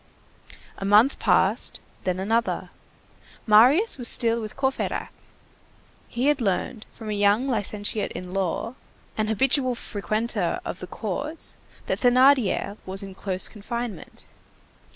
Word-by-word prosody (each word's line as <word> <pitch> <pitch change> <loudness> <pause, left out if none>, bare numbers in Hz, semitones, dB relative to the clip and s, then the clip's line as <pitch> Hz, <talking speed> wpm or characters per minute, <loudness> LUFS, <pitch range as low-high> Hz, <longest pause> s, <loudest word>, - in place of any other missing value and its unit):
A - - -5
month 210 +7 +4
passed, - - +2 0.3
then 185 0 -1
another. 225 +4 -1 0.7
Marius 260 - +5
was 240 - +2
still 230 0 +5
with 215 -1 -7
Courfeyrac. 265 -1 -2 1.0
He 245 +2 -2
had 290 -2 +2
learned 210 +2 -2
from 220 -2 -8
a - - -1
young 205 +5 +2
licentiate 210 -3 -2
in 180 0 -7
law, 195 +4 -2 0.4
an 215 0 -1
habitual 255 +3 +1
frequenter 215 -3 -2
of - - -5
the 180 - -7
courts, 255 - -4 0.3
that - - -1
Thénardier 250 -5 +3
was 190 +1 -1
in 195 -1 -8
close 185 -1 -2
confinement. 235 -1 -6
220 Hz, 125 wpm, -24 LUFS, 200-250 Hz, 1.0 s, Marius